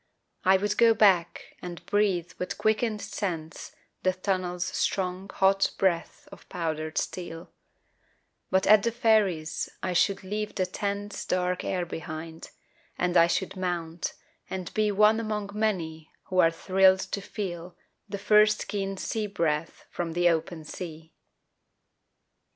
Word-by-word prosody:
I 190 +1 +6
would 205 +2 -1
go 230 -1 +6
back 190 -5 +2
and 175 -1 -8
breathe 190 -5 +1
with 180 - -3
quickened 215 -1 0
sense 175 -6 -5 0.3
The 185 - +2
tunnel's 185 -2 -1
strong 190 0 -2
hot 195 0 +3
breath 175 -3 0
of - - -14
powdered 155 -2 -3
steel; 170 -2 -4 1.0
But 190 0 +2
at 215 0 +7
the 235 - 0
ferries 205 -9 +1
I 185 - -1
should 195 +3 +2
leave 210 +2 -4
the 185 - +1
tense 200 +2 -4
Dark 180 0 -1
air 180 -2 -1
behind, 160 0 -7 0.5
and 180 0 0
I 170 -1 +7
should 190 +2 -1
mount 175 -3 -3 0.4
and 185 -2 -5
be 215 -1 +2
One 210 +2 +4
among 210 -2 -3
many 170 -8 -2
who 185 - -1
are 165 - +7
thrilled 190 +3 +4
to 190 +1 -4
feel 180 -4 -6 0.3
The 200 - -3
first 210 +1 +4
keen 195 -1 -3
sea 215 +2 -2
breath 165 -5 -2
from 170 -2 -3
the 175 +1 +4
open 165 -1 -2
sea. 160 -1 -8
185 Hz, 140 wpm, -27 LUFS, 170-205 Hz, 1.0 s, at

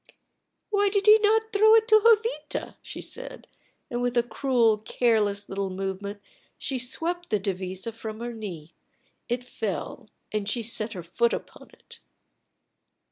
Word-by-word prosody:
"Why 405 -1 +3
did 400 0 0
he 430 +1 +8
not 440 +1 +2
throw 435 +2 +7
it 445 0 +4
to 435 0 +7
Jovita?" 455 +1 +2
she - - -8
said, - - -7 0.5
and 240 0 -1
with 245 0 0
a 240 - +5
cruel, 235 -2 +2
careless 210 -3 +1
little 195 0 -2
movement 195 +2 -4 0.4
she 265 -2 -3
swept 340 +8 -3
the 210 - +1
devisa 190 +2 -3
from 220 -1 -7
her 240 0 -4
knee; 180 -8 -8 0.6
it 245 +1 -1
fell, 215 -4 -5 0.2
and 210 -1 -2
she 235 +1 -1
set 220 0 -1
her 180 -4 -6
foot 235 +8 +1
upon - - -7
it. - - -13
235 Hz, 150 wpm, -26 LUFS, -, 0.6 s, he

